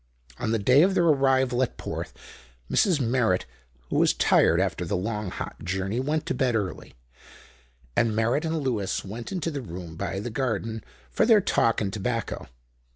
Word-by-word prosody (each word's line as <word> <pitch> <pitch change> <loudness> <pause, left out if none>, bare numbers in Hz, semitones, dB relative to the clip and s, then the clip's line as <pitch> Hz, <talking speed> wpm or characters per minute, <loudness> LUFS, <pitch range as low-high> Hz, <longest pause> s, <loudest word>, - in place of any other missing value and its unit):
On - - -2
the 115 - +2
day 125 +7 +5
of 190 +3 +3
their 175 - +3
arrival 135 -5 +3
at 130 - -1
Porth, - - -5 0.6
Mrs. 180 -7 +3
Merritt, 115 -7 +1 0.5
who - - +1
was - - +4
tired 85 - +4
after 95 -1 0
the 90 +3 -1
long, 105 +1 -3
hot - - -7
journey, 95 +6 -2
went 150 +4 -1
to - - -1
bed 125 -2 +1
early, 100 -4 -4 1.0
and 115 -2 +2
Merritt 115 +7 +1
and 160 -1 -1
Lewis 110 -9 -1
went 110 +4 -7
into 170 -4 -2
the 145 -2 -4
room 85 -6 -8
by 95 +2 -3
the 115 +4 -5
garden 115 -3 -2 0.3
for - - +2
their 225 -3 +7
talk 115 - +2
and 100 -2 -2
tobacco. 115 +1 -3
115 Hz, 175 wpm, -26 LUFS, 100-135 Hz, 1.0 s, their